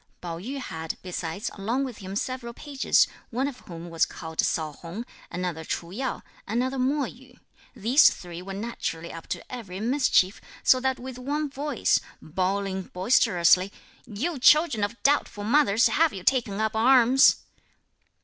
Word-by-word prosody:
Pao 170 -2 -6
yü 255 +10 -5
had, 160 -11 -5
besides, 180 +1 -4
along 230 +7 -1
with 255 -5 -6
him 195 -1 -7
several 240 +1 -3
pages, 280 -3 +2 0.2
one 255 +4 -1
of 270 -3 -7
whom 170 -1 -9
was 165 - +2
called 160 -1 -4
Sao 155 -2 -1
Hung, 175 +10 -7 0.2
another 175 -2 -4
Ch'u 170 +1 -4
Yo, 260 +2 -3 0.2
another 255 +5 -1
Mo 275 +3 +1
Yü. 250 0 -10 0.4
These 245 +6 +6
three 175 -1 -8
were 195 +1 -7
naturally 195 -6 -4
up 165 0 -9
to - - -6
every 200 -7 -6
mischief, 230 -5 +2 0.2
so 255 - +5
that 265 0 0
with 255 0 -8
one 290 +3 -2
voice, 280 -2 +1 0.2
bawling 190 +3 -2
boisterously, 185 -2 +3 0.4
"You 270 +9 -3
children 300 -5 +5
of 220 +3 -4
doubtful 275 -7 +1
mothers, 230 -1 +4
have 325 0 +2
you 190 - -7
taken 230 -4 +1
up 220 0 0
arms?" 250 +2 +6
225 Hz, 155 wpm, -26 LUFS, 185-260 Hz, 0.4 s, These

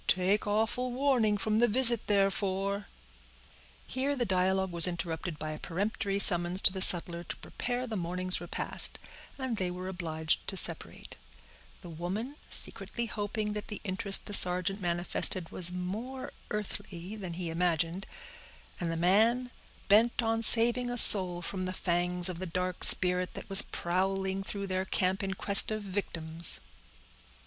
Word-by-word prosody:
Take 190 +4 0
awful 225 +4 -2
warning 245 -5 0
from 215 +1 -2
the 240 - +3
visit 240 0 +4
therefore—" 195 0 -1 1.0
Here 275 +2 -3
the 245 -3 -2
dialogue 190 0 -1
was 170 +1 +6
interrupted 170 -2 -5
by 155 0 -6
a 155 - -8
peremptory 200 +2 -4
summons 175 -1 +4
to 185 - +4
the 190 - -5
sutler 175 -2 +4
to - - -7
prepare 245 +1 -5
the 225 -3 -6
morning's 180 0 -2
repast, 175 - -4 0.4
and 260 -4 -4
they 185 -2 -3
were 180 +1 -8
obliged 160 -4 -3
to 190 - -4
separate; 165 -3 +1 0.6
the 175 - -12
woman 190 - -6
secretly 235 - +1
hoping 210 -1 -5
that 210 0 -7
the 210 - -7
interest 195 0 +1
the 205 - -8
sergeant 185 +1 +1
manifested 175 0 +1
was 180 -1 +1
more 220 +9 -7 0.2
earthly 200 -2 -6
than 190 -5 -8
he 170 -1 -5
imagined; 170 +2 -2 0.7
and 170 -2 -3
the 165 - -4
man, 225 +8 +1 0.4
bent 230 +4 +2
on 225 0 -1
saving 240 +2 +4
a 245 - -5
soul 180 -6 +7
from 185 +2 -5
the 185 - -5
fangs 175 0 +1
of 180 -2 -4
the 185 - -6
dark 180 +1 -4
spirit 180 0 +2
that - - -9
was 195 0 +9
prowling 190 +2 -3
through 200 0 -6
their 185 -1 -3
camp 190 +1 -1
in 195 -1 -4
quest 200 +1 +5
of 215 -1 -4
victims. 170 -4 -1
190 Hz, 155 wpm, -28 LUFS, 180-215 Hz, 1.0 s, was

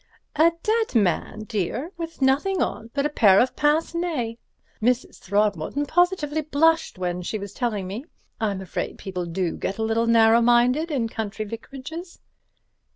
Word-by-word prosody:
"A 325 +2 +5
dead 440 - 0
man, 210 +1 +1
dear, 220 - -3
with 330 -4 -5
nothing 295 +9 +2
on 225 - -2
but 280 0 +1
a - - +2
pair 200 -9 +5
of 255 +1 +2
pince 300 +3 +2
nez. 315 -10 -2 0.5
Mrs. 245 +2 0
Throgmorton 205 - 0
positively 315 -2 +1
blushed 320 - +2
when 180 -1 -2
she 195 +5 -3
was 200 -1 -7
telling 215 -6 -2
me. 205 +9 -6 0.3
I'm 205 -4 -1
afraid 190 - -4
people 180 -2 -5
do 170 0 -1
get 195 - -3
a 220 - -1
little 225 +1 +1
narrow 230 0 +5
minded 245 +7 +3
in 260 -7 0
country 215 -1 -4
vicarages." 275 - -8
240 Hz, 160 wpm, -24 LUFS, 205-305 Hz, 0.5 s, A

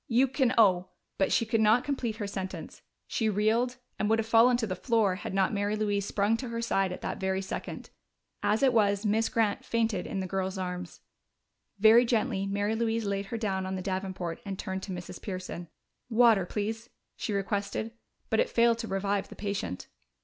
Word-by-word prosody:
You 250 +3 +4
can 260 -1 +1
owe 185 -5 +5
" - - -51
But 195 - +2
she 230 - +3
could 225 0 +1
not 220 +3 +5
complete 260 -6 -2
her 215 -2 -4
sentence: 190 -1 -6 0.2
she 220 -2 0
reeled, 225 +5 +1 0.2
and 210 - +1
would 225 - +4
have 225 - -1
fallen 230 +2 +5
to 235 - -1
the 185 -3 -3
floor 220 -1 +2
had - - -6
not 195 +2 +1
Mary 205 +1 0
Louise 205 -2 0
sprung 205 +2 +1
to 250 0 -5
her 230 0 -3
side 195 -5 +1
at 180 - -6
that - - -4
very 190 0 -1
second. 190 - -6 0.5
As 215 +5 +1
it 260 -2 +5
was, 205 -2 +2
Miss 220 +2 +2
Grant 225 +3 +1
fainted 225 -6 0
in 195 - -3
the 190 - -2
girl's 190 +1 -2
arms. 180 -1 -5 0.8
Very 220 +4 +7
gently 225 -4 0
Mary 205 +2 0
Louise 225 0 0
laid 200 0 -2
her 230 - -4
down 190 -4 -1
on 190 - -3
the 185 - -3
davenport 185 -3 -3
and 195 -2 -5
turned 190 -1 -4
to 190 - -6
Mrs. 175 -1 -7
Pearson. 185 -3 -5 0.4
"Water, 225 -5 +5
please," 220 +4 -3 0.3
she - - -4
requested. 200 +2 -2 0.4
But - - +3
it - - +2
failed 235 0 +3
to 225 - -4
revive 195 0 -1
the - - -10
patient. 195 - -4
205 Hz, 200 wpm, -29 LUFS, 190-230 Hz, 0.8 s, Very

